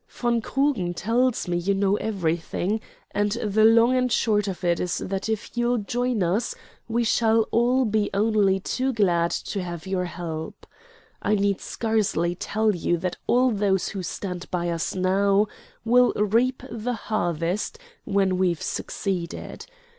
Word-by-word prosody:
"Von 240 Hz, -1 st, 0 dB
Krugen 245 Hz, -9 st, 0 dB
tells 235 Hz, +5 st, +1 dB
me 175 Hz, 0 st, 0 dB
you 190 Hz, +3 st, 0 dB
know 195 Hz, 0 st, +2 dB
everything, 185 Hz, +1 st, -1 dB, 0.3 s
and 205 Hz, 0 st, 0 dB
the 215 Hz, -2 st, +1 dB
long 230 Hz, +3 st, +6 dB
and 250 Hz, -1 st, +1 dB
short 210 Hz, -3 st, +2 dB
of 190 Hz, -1 st, -5 dB
it 170 Hz, -1 st, +2 dB
is 180 Hz, -, -1 dB
that 195 Hz, +3 st, -3 dB
if 220 Hz, +1 st, -3 dB
you'll 240 Hz, +1 st, +1 dB
join 240 Hz, 0 st, -1 dB
us 195 Hz, +8 st, 0 dB, 0.3 s
we 235 Hz, +1 st, 0 dB
shall 225 Hz, 0 st, +3 dB
all 250 Hz, +3 st, +3 dB
be 215 Hz, -1 st, +1 dB
only 200 Hz, -2 st, +2 dB
too 260 Hz, +7 st, -1 dB
glad 175 Hz, -6 st, +2 dB
to 200 Hz, -, -3 dB
have 175 Hz, -3 st, -6 dB
your 190 Hz, -1 st, -1 dB
help. 165 Hz, -2 st, -6 dB, 0.6 s
I 210 Hz, -, +2 dB
need 200 Hz, -1 st, +1 dB
scarcely 210 Hz, -7 st, 0 dB
tell 215 Hz, +4 st, 0 dB
you 175 Hz, 0 st, 0 dB
that 180 Hz, +1 st, -3 dB
those 210 Hz, -6 st, +2 dB
who 195 Hz, -, -5 dB
stand 180 Hz, 0 st, -5 dB
by 175 Hz, -1 st, -1 dB
us 165 Hz, +2 st, -2 dB
now 195 Hz, +2 st, +3 dB, 0.4 s
will 245 Hz, +2 st, +5 dB
reap 230 Hz, +5 st, +1 dB
the 235 Hz, +2 st, -3 dB
harvest 180 Hz, -, -2 dB, 0.3 s
when 190 Hz, -2 st, +1 dB
we've 175 Hz, -3 st, +1 dB
succeeded. 180 Hz, -4 st, -4 dB
205 Hz, 150 wpm, -25 LUFS, 180-230 Hz, 0.6 s, long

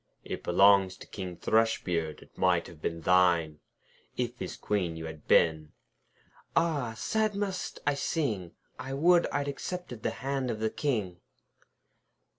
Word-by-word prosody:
'It -, -, -5 dB
belongs 95 Hz, -2 st, +5 dB
to -, -, -11 dB
King 90 Hz, -4 st, -7 dB
Thrushbeard. 90 Hz, -8 st, 0 dB
It -, -, -24 dB
might 90 Hz, -2 st, +2 dB
have 80 Hz, -2 st, -13 dB
been 85 Hz, +1 st, -3 dB
thine, 85 Hz, -3 st, +3 dB, 0.6 s
If -, -, -2 dB
his -, -, -5 dB
Queen 90 Hz, -5 st, -1 dB
you 80 Hz, -, -6 dB
had 80 Hz, -2 st, -9 dB
been.' 80 Hz, -2 st, +3 dB, 0.8 s
'Ah! 145 Hz, -9 st, +1 dB
sad 215 Hz, -, 0 dB
must 195 Hz, -3 st, -3 dB
I 145 Hz, -, +3 dB
sing! 130 Hz, -, -2 dB, 0.3 s
I 135 Hz, +1 st, -4 dB
would 170 Hz, +4 st, +4 dB
I'd 145 Hz, 0 st, -2 dB
accepted 140 Hz, -3 st, -5 dB
the -, -, 0 dB, 0.2 s
hand 135 Hz, -2 st, -1 dB
of 110 Hz, -2 st, -3 dB
the 110 Hz, 0 st, 0 dB
King.' 105 Hz, -12 st, -1 dB
105 Hz, 145 wpm, -29 LUFS, 85-140 Hz, 0.8 s, belongs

